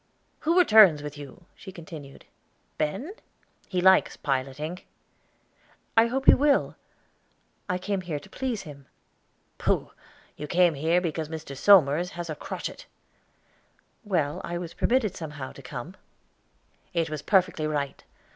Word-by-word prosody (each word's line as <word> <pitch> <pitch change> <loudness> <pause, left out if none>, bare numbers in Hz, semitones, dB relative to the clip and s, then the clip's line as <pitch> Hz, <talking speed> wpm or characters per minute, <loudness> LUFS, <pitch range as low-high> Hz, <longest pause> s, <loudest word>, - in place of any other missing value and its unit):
"Who 330 +3 +1
returns 215 - +7
with 145 0 -6
you," 145 +4 -11
she 190 - -11
continued, 155 -5 -11 0.5
"Ben? 195 - -2 0.6
He 180 -2 0
likes 190 +1 +4
piloting." 140 +5 -3 1.2
"I 225 +1 +6
hope 265 +3 -2
he - - +9
will; 285 0 +2 0.9
I 180 - 0
came 195 +1 -2
here 170 -4 -4
to - - -15
please 255 -5 -4
him." 140 -4 -12 0.7
"Pooh! - - 0 0.5
You 150 - -6
came 175 +1 +3
here 160 +5 +1
because 160 -3 -3
Mr. 160 -3 -7
Somers 175 0 +5
had 170 -2 -4
a - - -4
crotchet." - - -7 1.2
"Well; 165 -9 -1
I 175 - -4
was 175 -1 -6
permitted 230 -6 +1
somehow 150 -5 -7
to - - -13
come." 135 +6 -8 1.0
"It 165 -2 0
was 155 -2 -4
perfectly 180 -4 +2
right. 145 -2 -3
170 Hz, 135 wpm, -26 LUFS, 150-190 Hz, 1.2 s, he